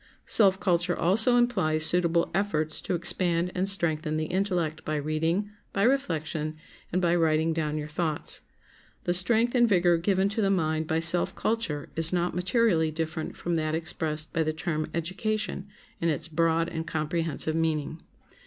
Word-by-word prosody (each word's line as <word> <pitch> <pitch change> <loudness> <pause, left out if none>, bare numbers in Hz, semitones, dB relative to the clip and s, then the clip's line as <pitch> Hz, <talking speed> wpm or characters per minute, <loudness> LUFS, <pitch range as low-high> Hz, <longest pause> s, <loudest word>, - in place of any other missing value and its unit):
Self 195 -3 +4
culture 175 -2 0
also 220 +8 +3
implies 180 -11 +2
suitable 170 0 +1
efforts 160 -5 -1
to - - -2
expand 175 0 +3
and 185 +2 0
strengthen 155 -5 0
the 155 - -2
intellect 175 -3 -2
by 155 - -3
reading, 160 +7 -1 0.2
by 195 - 0
reflection, 160 - -1 0.3
and 185 - 0
by 175 -2 +1
writing 160 -1 +1
down 155 -2 -2
your 150 0 -5
thoughts. 155 0 -2 0.6
The 175 - 0
strength 225 +6 +4
and 240 -2 +3
vigor 175 -3 +3
given 190 +3 +1
to 215 +2 -2
the 195 - +1
mind 160 -4 0
by 160 +1 0
self 175 +3 +6
culture 215 -11 -2
is 165 0 +2
not 175 -1 -1
materially 180 -2 +1
different 160 0 -5
from 175 - -3
that 155 0 -1
expressed 155 -1 -3
by 165 - 0
the 155 0 -1
term 155 -1 -3
education 190 +3 -3 0.3
in 165 - 0
its 155 +1 -2
broad 165 +1 +1
and 160 -1 -5
comprehensive 160 0 -1
meaning. 160 -1 -2
170 Hz, 160 wpm, -26 LUFS, 155-185 Hz, 0.6 s, self